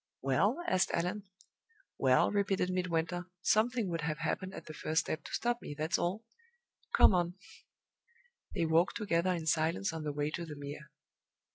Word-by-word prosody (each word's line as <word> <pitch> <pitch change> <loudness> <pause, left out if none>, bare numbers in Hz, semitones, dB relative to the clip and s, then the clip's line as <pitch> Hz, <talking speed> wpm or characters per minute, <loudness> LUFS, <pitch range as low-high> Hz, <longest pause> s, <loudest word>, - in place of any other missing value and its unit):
"Well?" 205 - +2
asked 185 0 +2
Allan. 185 +5 -2 0.7
"Well," 130 -1 +4
repeated 195 -2 +1
Midwinter, 175 -1 -1 0.2
"something 230 0 +2
would 165 -1 -2
have 155 -1 -2
happened 185 +3 -3
at - - -8
the 155 - -8
first 155 +1 0
step 155 - -4
to - - -8
stop 240 0 0
me, 145 - -7
that's 160 +4 0
all. 190 +6 -1 0.7
Come - - +7
on." 175 -1 +1 1.2
They 165 - +1
walked 165 +3 +3
together 185 -4 +1
in 170 -3 -2
silence 160 +4 +1
on 160 - -4
the 150 -1 -2
way 145 +1 -1
to 170 - -4
the 155 -3 -7
Mere. 145 +1 -8
170 Hz, 165 wpm, -33 LUFS, 155-190 Hz, 1.2 s, Come